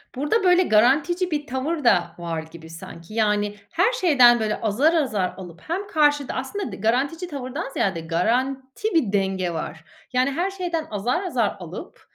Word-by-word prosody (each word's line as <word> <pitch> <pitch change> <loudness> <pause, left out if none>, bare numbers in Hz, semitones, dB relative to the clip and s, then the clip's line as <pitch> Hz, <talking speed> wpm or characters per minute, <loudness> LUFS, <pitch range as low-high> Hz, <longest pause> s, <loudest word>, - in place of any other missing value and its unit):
Burada, 300 - 0
böyle, 360 0 +5
garantici 315 - +2
bir 295 -1 -2
tavır 275 +4 -2
da, 195 -7 +3
var 165 -2 -4
gibi 160 -1 -12
sanki. 165 +3 -11
Yani 210 -2 +1 0.2
her 400 +9 +2
şeyden, 255 - +5
böyle, 215 -1 -2
azar 245 +10 +2
azar 215 - 0
alıp 175 -3 -10
hem 380 +5 -4
karşıda 295 -5 +2
aslında 265 +11 -4
garantici 270 - 0
tavırdan 270 +2 -5
ziyade, 190 -10 -1
garanti 260 - -1
bir 260 -12 +2
denge 190 -3 0
var. 160 0 -6 0.3
Yani 255 +2 +2
her 360 +7 -1
şeyden 350 -4 -3
azar 240 - -1
azar 245 - 0
alıp, 180 - -9
255 Hz, 160 wpm, -23 LUFS, 200-325 Hz, 0.3 s, böyle